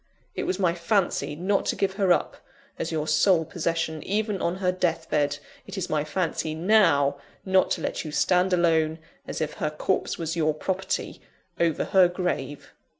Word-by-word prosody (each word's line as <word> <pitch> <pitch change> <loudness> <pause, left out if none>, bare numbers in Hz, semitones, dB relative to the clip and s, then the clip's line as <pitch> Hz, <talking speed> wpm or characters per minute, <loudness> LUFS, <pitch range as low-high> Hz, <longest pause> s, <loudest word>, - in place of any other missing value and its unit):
It - - -3
was 185 - -1
my 180 -4 +2
fancy 175 -4 0
not 190 +5 0
to - - +1
give 195 -1 0
her 195 -2 +1
up, - - +1 0.4
as 165 - -2
your 155 -1 -2
sole 160 +2 +3
possession, 165 -2 -2
even 210 -1 -1
on 170 - 0
her 185 -1 0
death 170 -3 -1
bed: 145 -1 +1 0.3
it - - -7
is 185 -1 -3
my 150 -1 +1
fancy, 155 -1 -2
now, 165 -6 +3 0.3
not 190 -1 +3
to - - -9
let - - -3
you 155 - -6
stand 180 +4 +2
alone 160 -3 +2 0.3
as - - -4
if 155 -1 -2
her 155 - +1
corpse 155 +5 -1
was 165 0 -3
your 155 -2 +1
property 190 +4 -3 0.4
over 165 -3 +1
her 190 -2 +5
grave!" 175 -5 -4
170 Hz, 180 wpm, -26 LUFS, 155-190 Hz, 0.4 s, her